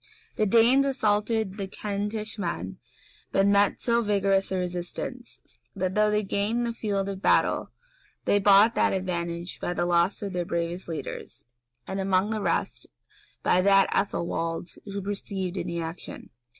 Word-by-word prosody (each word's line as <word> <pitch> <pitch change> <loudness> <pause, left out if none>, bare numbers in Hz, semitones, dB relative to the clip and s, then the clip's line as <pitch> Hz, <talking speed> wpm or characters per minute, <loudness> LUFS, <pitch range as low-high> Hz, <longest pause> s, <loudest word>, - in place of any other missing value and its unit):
The 215 - +1
Danes 235 +6 +5
assaulted 215 -4 0
the 195 -2 -3
Kentish 210 +2 -4
men, 170 - -4 0.5
but 195 - +3
met 200 0 +4
with - - -15
so 235 -1 +2
vigorous 195 -3 +1
a 190 - 0
resistance, 180 +7 -5 0.3
that, 185 -1 -1
though 210 +1 +3
they 210 0 +1
gained 210 +5 0
the 235 - -2
field 200 -4 -2
of 195 -1 -5
battle, - - +2 0.6
they 205 - +3
bought 205 +3 +6
that - - +2
advantage 175 -2 -3
by 175 - -3
the 175 - 0
loss 175 +4 +2
of 200 -2 -4
their 180 -1 -1
bravest 170 +1 -3
leaders, 165 -2 -7 0.4
and, 190 - -4
among 190 +2 +1
the 215 -1 -2
rest, 170 -4 -1 0.6
by 180 - +4
that 195 0 +4
of 200 - +3
Ethelwald, 165 0 -3
who 200 -1 -5
perished 205 +1 -5
in 190 -1 -3
the 170 0 -3
action. 165 +1 -8
195 Hz, 165 wpm, -26 LUFS, 180-210 Hz, 0.6 s, bought